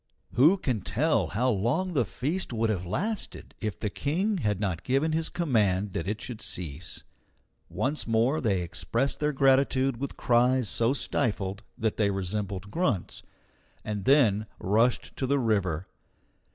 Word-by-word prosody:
Who 155 +11 +6
can 125 - -1
tell 120 - +1
how 125 +9 +1
long 125 - 0
the 130 -7 +2
feast 155 - -2
would 115 -1 +1
have 90 -4 -3
lasted 205 - -3
if 105 -2 -3
the 105 - -2
King 185 - 0
had 105 - 0
not 95 -6 -1
given 135 +5 +1
his 160 0 0
command 105 - +1
that 85 - -3
it 105 +2 -2
should 120 -4 -6
cease? 80 -1 -5 0.7
Once 115 - -1
more 120 +7 +2
they 100 -8 +1
expressed 115 +10 -1
their 150 0 +1
gratitude 135 -1 +3
with 140 +2 -5
cries 125 0 +3
so 115 +5 +1
stifled 100 -7 -1 0.2
that 110 -1 -1
they 105 -2 +2
resembled 100 0 -3
grunts, 125 - -1 0.6
and 105 -2 -3
then 110 -7 +4
rushed 115 +6 +1
to 130 - -1
the 140 +2 +2
river. 100 - 0
115 Hz, 150 wpm, -28 LUFS, 100-140 Hz, 0.7 s, Who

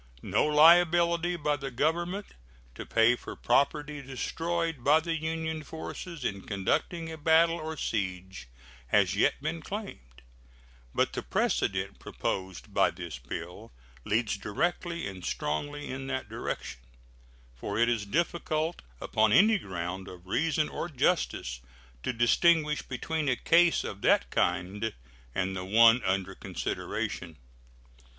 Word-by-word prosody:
No - - +2
liability 170 +2 +5
by 150 -3 0
the 135 -1 -5
Government 170 - -1 0.5
to - - -8
pay 115 +1 +4
for - - -9
property 145 +3 +1
destroyed 165 +3 -3
by 150 +4 +6
the 165 +1 -2
Union 160 0 -3
forces 160 0 -7
in 100 -1 -2
conducting 160 - -1
a 160 - -8
battle 165 +2 +4
or 160 0 -5
siege 95 - -3 0.4
has - - +3
yet - - +2
been 160 +2 -2
claimed, 60 - -8 0.7
but - - +2
the - - -3
precedent 95 +9 -1
proposed 95 -1 -4
by - - +4
this 85 -6 -7
bill - - -7 0.3
leads 110 - 0
directly 170 - -2
and 95 -2 -8
strongly 145 - -3
in 135 +1 -5
that 130 -1 -3
direction, - - -5 0.7
for 100 +12 -5
it 120 +1 +4
is 115 -3 +1
difficult 160 - -1 0.2
upon 110 -1 +2
any 210 - +6
ground 95 - -5
of 90 -1 -11
reason 150 - +1
or 175 - -4
justice 130 - 0 0.4
to - - -1
distinguish 150 +6 +3
between 150 +3 -2
a 125 - +3
case 170 +5 +4
of 100 - -6
that - - +3
kind 105 +4 0 0.4
and 95 +1 -1
the 95 - -4
one 115 +5 +6
under 95 0 0
consideration. 85 -3 -4
140 Hz, 130 wpm, -29 LUFS, 95-165 Hz, 0.7 s, by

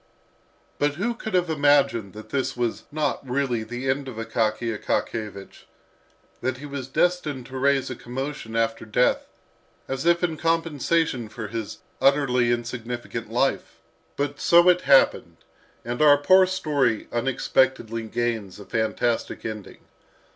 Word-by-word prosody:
But 145 0 +1
who 230 +8 -1
could 220 -4 -5
have 180 -1 +2
imagined 140 -9 +2
that 110 +1 -11
this 135 -2 -2
was 120 -2 -2
not 150 -2 -1
really 125 -3 0
the 120 +4 -5
end 135 +1 0
of 130 - -7
Akaky 115 0 -1
Akakiyevich, 105 -2 -4 0.8
that 130 0 -1
he 145 - -9
was 140 -3 -6
destined 150 -4 0
to 130 0 -8
raise 135 -1 +2
a - - -4
commotion 125 -2 -6
after 115 0 0
death, 120 +3 +1 0.6
as 135 0 -3
if 170 +1 +3
in 165 -3 0
compensation 165 -6 0
for 110 -1 -7
his 115 -2 -5 0.2
utterly 135 -4 +3
insignificant 120 0 -4
life? - - 0 0.4
But 145 0 -2
so 175 +1 +6
it 180 0 +4
happened, 135 0 +3 0.5
and 120 +3 -3
our 145 -1 +7
poor 185 +6 +5
story 145 - 0
unexpectedly 120 -2 0
gains 115 -4 -2
a 100 - -10
fantastic 115 +1 -1
ending. 110 -3 -7
130 Hz, 140 wpm, -24 LUFS, 115-145 Hz, 0.8 s, our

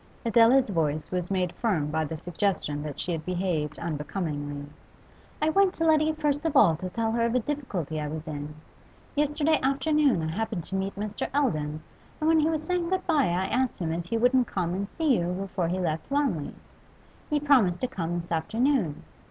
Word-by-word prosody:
Adela's 235 +3 +5
voice 155 -4 -1
was 180 -1 -2
made 180 -2 0
firm 170 -11 0
by 160 +1 0
the 155 +1 -4
suggestion 170 -3 -1
that 150 -2 -6
she 180 - -2
had 160 -2 -3
behaved 175 -5 -2
unbecomingly. 145 -2 -4 0.8
'I 310 - +4
went 390 +2 +3
to 330 - -1
Letty 310 -1 +4
first 295 -2 0
of 325 -3 -1
all 170 -6 +6
to 185 +3 -5
tell 225 +4 -1
her 230 0 +1
of 235 +1 +1
a - - +4
difficulty 205 - -3
I 150 - -3
was 155 +1 -5
in. 150 0 -5 0.6
Yesterday 295 +2 +2
afternoon 275 - +2
I 160 - -2
happened 215 -1 -2
to 190 - -5
meet 190 +1 -2
Mr. 205 +1 -4
Eldon, 155 - 0 0.4
and 310 - 0
when 325 0 +5
he 310 +1 +3
was 315 -1 -1
saying 345 +1 -1
good 375 0 -1
bye 300 - +3
I 180 +2 0
asked 255 0 +1
him 165 -3 -2
if 170 0 -3
he 230 +6 -1
wouldn't 245 +1 +3
come 175 -2 -2
and 200 +2 -2
see 310 -7 +3
you 175 +1 -1
before 185 -2 -2
he 180 +2 -1
left 160 -3 -2
Wanley. 275 - 0 0.7
He 300 - +2
promised 255 -12 +4
to 255 - +1
come 175 -8 -3
this 170 +1 -9
afternoon. 220 - 0
195 Hz, 200 wpm, -27 LUFS, -, 0.8 s, all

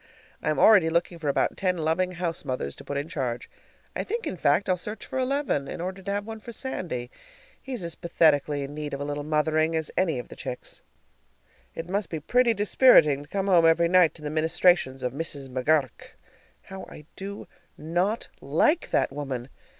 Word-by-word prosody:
I - - -1
am 155 - 0
already 190 -1 +6
looking 170 +1 -1
about 140 -2 +2
for - - -18
ten 185 -2 0
loving 170 +3 0
house 175 -2 -3
mothers 125 - -3
to - - -11
put 140 - -4
in 145 +2 -3
charge. 130 -8 -4 0.4
I - - -1
think, 460 +1 -3
in 300 - -3
fact, 165 +4 +2
I'll 185 - +3
search 210 +4 -7
for 260 - -4
eleven, 260 - 0
in - - -6
order 185 +2 -4
to 200 +1 -4
have 205 0 -2
one 220 0 -7
for 235 - -9
Sandy. 170 - -5 0.5
He's 255 -8 -5
as 170 -1 -4
pathetically 150 -4 +2
in 140 +1 -7
need 150 -1 -4
of - - -7
a - - -3
little 145 0 -3
mothering 155 +1 +1
as 160 -1 -2
any 170 -7 +1
of 125 - -7
the - - -10
chicks. 125 - -7 0.9
It 165 - -5
must 195 +1 -2
be 160 - -4
pretty 240 - +2
dispiriting 195 - +5
to 145 - -14
come 195 +1 -1
home 175 -4 +5
every 170 +1 +4
night 180 -2 +5
to 155 - -13
the 150 - -3
ministrations 160 -4 +2
of 125 -1 -1
Mrs. 140 -3 -5
McGur 135 +4 +3
rk. 130 - -16 0.5
How 190 0 -9
I 150 - -12
do 200 +1 -7 0.3
not 175 +8 -1
like 165 - +2
that - - +1
woman! 135 -3 -5
165 Hz, 205 wpm, -26 LUFS, 145-190 Hz, 0.9 s, already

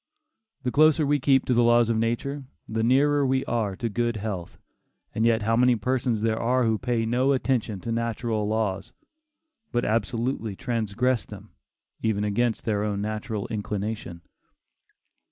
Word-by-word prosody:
The 125 - -1
closer 155 +2 +4
we 145 +1 +2
keep 135 0 +3
to 125 - +1
the 120 - +4
laws 120 -1 +4
of - - +1
nature, 120 +5 -2 0.2
the 110 0 -2
nearer 140 +5 +3
we 130 0 +1
are 110 -5 -1
to 115 - -3
good 120 +1 -1
health, 100 -5 -5 0.6
and 110 +1 +2
yet 115 -2 +2
how 115 +1 +2
many 125 +1 +4
persons 120 0 -1
there 110 0 0
are 125 +2 +2
who 110 -2 +1
pay 120 -2 0
no 125 +4 +2
attention 120 -6 -1
to 115 - -4
natural 115 -2 -1
laws, 105 -3 -2 0.8
but 120 0 0
absolutely 115 0 -1
transgress 115 +2 -1
them, 105 0 -12 0.5
even 110 -2 0
against 110 +3 0
their 105 -2 0
own 105 -1 -1
natural 110 0 -3
inclination. 105 -4 -4
115 Hz, 155 wpm, -25 LUFS, 110-125 Hz, 0.8 s, closer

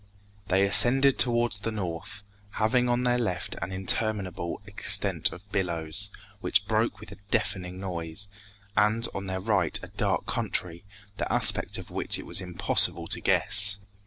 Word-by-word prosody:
They 95 +1 +2
ascended 125 +7 +6
towards 120 -4 0
the 105 - -4
north, 95 -1 -7 0.3
having 125 +3 0
on 120 +1 0
their 125 0 +1
left 90 -7 -4
an 85 +2 -5
interminable 95 -2 -3
extent 100 0 +1
of 100 +3 -13
billows, 85 +1 -1 0.3
which 100 -1 +1
broke 110 0 -1
with 105 -1 -13
a 100 - -12
deafening 95 -4 -2
noise, 90 0 -3 0.5
and 110 +3 +1
on 95 0 -6
their 95 0 -4
right 95 -4 -1
a - - -9
dark - - -2
country, 85 +1 -2 0.3
the - - -4
aspect - - +4
of - - -11
which - - -1
it - - -9
was - - 0
impossible 90 -2 +3
to - - +2
guess. 100 -1 +4
100 Hz, 155 wpm, -26 LUFS, 90-110 Hz, 0.5 s, ascended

